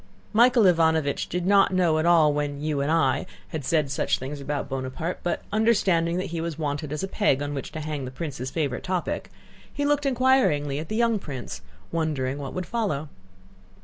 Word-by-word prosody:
Michael 240 Hz, +1 st, +5 dB
Ivánovich 160 Hz, -4 st, +2 dB
did 180 Hz, 0 st, -2 dB
not 195 Hz, 0 st, +5 dB
at 185 Hz, -, +1 dB
all 160 Hz, -3 st, +3 dB
know 165 Hz, -2 st, +5 dB
when 145 Hz, -1 st, -2 dB
"you 150 Hz, -1 st, -1 dB
and 140 Hz, +2 st, 0 dB
I" 140 Hz, -6 st, +2 dB, 0.2 s
had 155 Hz, -3 st, -4 dB
said 150 Hz, -1 st, +1 dB
such 135 Hz, -, +1 dB
things 140 Hz, +2 st, -6 dB
about 145 Hz, +1 st, -3 dB
Bonaparte, 135 Hz, +6 st, -4 dB
but 175 Hz, -, -2 dB
understanding 190 Hz, -6 st, +2 dB
that 185 Hz, -1 st, -3 dB
he 165 Hz, -, -2 dB
was 165 Hz, -2 st, -4 dB
wanted 145 Hz, -1 st, -3 dB
as 150 Hz, +4 st, -3 dB
a -, -, -1 dB
peg 195 Hz, -9 st, +1 dB
on 145 Hz, 0 st, -3 dB
which 135 Hz, -, -5 dB
to 155 Hz, -, -4 dB
hang 150 Hz, -3 st, -4 dB
the -, -, -5 dB
prince's 130 Hz, -2 st, -5 dB
favorite 140 Hz, -3 st, -2 dB
topic, 180 Hz, -2 st, -2 dB, 0.4 s
he 285 Hz, -, -2 dB
looked 290 Hz, 0 st, +2 dB
inquiringly 250 Hz, -, +2 dB
at 155 Hz, -, -7 dB
the 215 Hz, -, -2 dB
young 230 Hz, -2 st, +2 dB
prince, 125 Hz, -, -7 dB, 0.3 s
wondering 145 Hz, -5 st, -1 dB
what 140 Hz, -2 st, -6 dB
would 185 Hz, -1 st, -2 dB
follow. 165 Hz, -11 st, -2 dB
160 Hz, 195 wpm, -25 LUFS, 145-185 Hz, 0.4 s, Michael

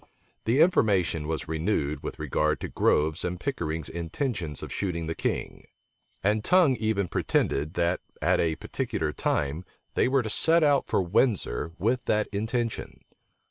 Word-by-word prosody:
The 120 Hz, +7 st, +3 dB
information 95 Hz, -, +3 dB
was 80 Hz, 0 st, -3 dB
renewed 80 Hz, -2 st, -1 dB
with -, -, -6 dB
regard 75 Hz, 0 st, 0 dB
to -, -, -3 dB
Grove's 75 Hz, +1 st, +1 dB
and 90 Hz, 0 st, -3 dB
Pickering's 80 Hz, -, -3 dB
intentions 85 Hz, -, -3 dB
of -, -, -6 dB
shooting 85 Hz, -4 st, -2 dB
the 80 Hz, -, -2 dB
king; -, -, -3 dB, 0.6 s
and 105 Hz, +2 st, +2 dB
Tongue 175 Hz, -5 st, +5 dB
even 110 Hz, -3 st, 0 dB
pretended, 75 Hz, 0 st, 0 dB
that, 85 Hz, +1 st, +1 dB, 0.2 s
at -, -, +2 dB
a 80 Hz, -2 st, +1 dB
particular -, -, -3 dB
time, 75 Hz, +5 st, -1 dB, 0.3 s
they -, -, +2 dB
were 130 Hz, -1 st, +2 dB
to 110 Hz, -, -4 dB
set 165 Hz, +7 st, +4 dB
out 145 Hz, -2 st, +3 dB
for -, -, +1 dB
Windsor 90 Hz, -, 0 dB
with 120 Hz, +4 st, 0 dB
that 105 Hz, 0 st, +2 dB
intention. 110 Hz, +3 st, -3 dB
95 Hz, 150 wpm, -27 LUFS, 80-115 Hz, 0.6 s, Tongue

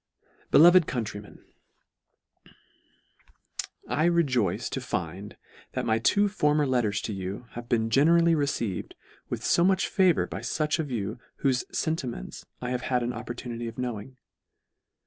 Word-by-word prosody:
Beloved 175 Hz, +1 st, +7 dB
Countrymen, 105 Hz, -5 st, -5 dB, 2.4 s
I 155 Hz, -, +1 dB
REJOICE 135 Hz, -, +1 dB
to -, -, -3 dB
find, 90 Hz, +5 st, -5 dB, 0.4 s
that -, -, -2 dB
my 110 Hz, 0 st, +2 dB
two 205 Hz, -, +3 dB
former 150 Hz, -7 st, +2 dB
letters 120 Hz, -6 st, +1 dB
to 110 Hz, -, -3 dB
you, 95 Hz, +4 st, -5 dB
have 120 Hz, 0 st, -8 dB
been 115 Hz, -1 st, +1 dB
generally 165 Hz, +6 st, +5 dB
re 145 Hz, -3 st, +1 dB
ceived 110 Hz, -10 st, -3 dB, 0.4 s
with -, -, -4 dB
fo 170 Hz, -, +3 dB
much 190 Hz, +1 st, +3 dB
favour 185 Hz, -4 st, +3 dB
by -, -, -6 dB
fuch 155 Hz, +1 st, -1 dB
of 155 Hz, -3 st, -2 dB
you 110 Hz, -1 st, -3 dB, 0.2 s
whofe 130 Hz, -3 st, +2 dB
fentiments 135 Hz, -, -3 dB, 0.2 s
I 125 Hz, -, -2 dB
have 125 Hz, -1 st, -1 dB
had 125 Hz, 0 st, 0 dB
an 120 Hz, +1 st, -2 dB
opportunity 120 Hz, 0 st, -6 dB
of 115 Hz, -, -8 dB
knowing. 125 Hz, 0 st, -5 dB
125 Hz, 140 wpm, -27 LUFS, 110-155 Hz, 2.4 s, Beloved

